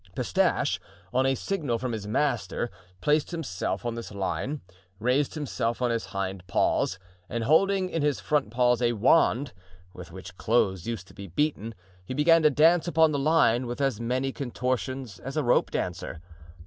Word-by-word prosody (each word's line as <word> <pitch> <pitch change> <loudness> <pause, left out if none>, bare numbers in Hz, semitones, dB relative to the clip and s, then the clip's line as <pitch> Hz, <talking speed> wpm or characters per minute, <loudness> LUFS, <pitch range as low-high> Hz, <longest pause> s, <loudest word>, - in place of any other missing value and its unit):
Pistache, - - +1 0.3
on 130 +1 +3
a 135 - +2
signal 145 -6 -2
from 125 +1 -3
his 105 -3 -4
master, 120 -2 -1 0.3
placed 150 0 +2
himself 110 - -3
on 120 - -1
this 115 -1 -7
line, 105 +9 -3 0.4
raised 130 +8 +1
himself 125 -6 -2
on 125 -1 +1
his 115 -1 -1
hind 95 -2 -4
paws, 90 0 +1 0.3
and 115 0 -2
holding 190 - +3
in 165 -3 -2
his 145 -2 +1
front 145 -8 0
paws 125 +1 +2
a 120 -1 +2
wand 125 +1 +3 0.4
with 90 -1 -10
which 90 0 -10
clothes 95 -5 +1
used 110 -5 -4
to - - -16
be 100 -1 -9
beaten, 115 - -1 0.3
he 130 - -6
began 165 +3 +5
to 155 - +6
dance 160 +4 +4
upon 160 -2 +4
the 145 - 0
line 135 -5 +3
with 120 +2 -5
as 135 -6 0
many 130 +3 -1
contortions 130 -4 -3
as 135 +8 -6
a 155 - +2
rope 120 - +3
dancer. 90 -2 -4
125 Hz, 175 wpm, -27 LUFS, 110-150 Hz, 0.4 s, to